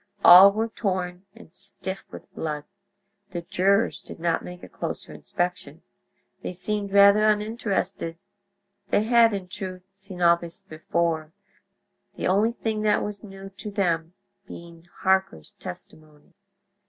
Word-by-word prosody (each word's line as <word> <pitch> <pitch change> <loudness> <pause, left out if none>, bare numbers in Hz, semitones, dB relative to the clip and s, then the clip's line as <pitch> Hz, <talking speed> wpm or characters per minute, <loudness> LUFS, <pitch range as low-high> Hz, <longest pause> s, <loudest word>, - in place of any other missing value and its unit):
All 185 +3 +11
were 220 +3 -1
torn, 185 -4 -3
and 195 -8 -16
stiff 195 0 -4
with - - -12
blood. 150 -2 -4 0.7
The 175 -1 -4
jurors 195 +4 +1
did - - -10
not 165 0 0
make 180 0 -10
a - - -8
closer - - -6
inspection. 175 0 -4 0.6
They - - -5
seemed 200 +2 -3
rather 200 +1 +6
uninterested. 205 -5 -1 0.7
They 210 - +2
had, 230 0 +5
in 195 -3 -4
truth, 185 -1 -7
seen 195 -2 -9
all 170 -1 +5
this 170 -1 -4
before; 160 0 -2 0.8
the - - -4
only 210 +5 +2
thing 220 -2 -2
that 210 -1 +2
was 205 0 -6
new 195 -1 -10
to 210 - -6
them 175 -4 -1 0.3
being 170 0 -12
Harker's 190 - +1
testimony. 155 +2 -11
190 Hz, 135 wpm, -25 LUFS, 170-205 Hz, 0.8 s, All